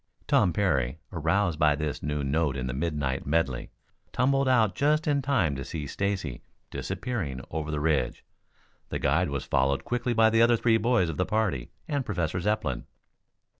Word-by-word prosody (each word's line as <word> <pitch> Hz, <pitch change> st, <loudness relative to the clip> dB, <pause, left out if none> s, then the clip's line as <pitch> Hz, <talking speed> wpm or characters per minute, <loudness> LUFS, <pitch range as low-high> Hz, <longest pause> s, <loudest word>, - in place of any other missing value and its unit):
Tom 90 Hz, -, +3 dB
Parry, 75 Hz, -9 st, 0 dB, 0.2 s
aroused 85 Hz, +1 st, +1 dB
by 75 Hz, -2 st, +4 dB
this 75 Hz, -1 st, -3 dB
new 75 Hz, 0 st, -2 dB
note 70 Hz, 0 st, 0 dB
in 65 Hz, -, -3 dB
the 60 Hz, -, -3 dB
midnight 70 Hz, -3 st, -2 dB
medley, 70 Hz, -5 st, 0 dB, 0.4 s
tumbled 135 Hz, +2 st, +2 dB
out 115 Hz, -5 st, +3 dB
just 150 Hz, +2 st, +2 dB
in 145 Hz, -2 st, +2 dB
time 130 Hz, -, +1 dB
to 70 Hz, -, -4 dB
see 75 Hz, +2 st, -5 dB
Stacy 95 Hz, -4 st, -3 dB, 0.3 s
disappearing 100 Hz, -, -3 dB
over 75 Hz, -1 st, -3 dB
the 75 Hz, -1 st, -1 dB
ridge. 75 Hz, -1 st, 0 dB, 0.6 s
The -, -, -2 dB
guide 80 Hz, +5 st, +1 dB
was 70 Hz, -2 st, -3 dB
followed 70 Hz, 0 st, +1 dB
quickly 120 Hz, 0 st, -1 dB
by 110 Hz, -1 st, +5 dB
the 115 Hz, +1 st, +4 dB
other 115 Hz, 0 st, +5 dB
three 115 Hz, 0 st, +3 dB
boys 115 Hz, -6 st, +2 dB
of 80 Hz, -, -4 dB
the 90 Hz, -, +1 dB
party 105 Hz, -, 0 dB, 0.2 s
and 145 Hz, -2 st, -1 dB
Professor 90 Hz, -6 st, -2 dB
Zepplin. 90 Hz, -, -1 dB
85 Hz, 170 wpm, -27 LUFS, 70-115 Hz, 0.6 s, by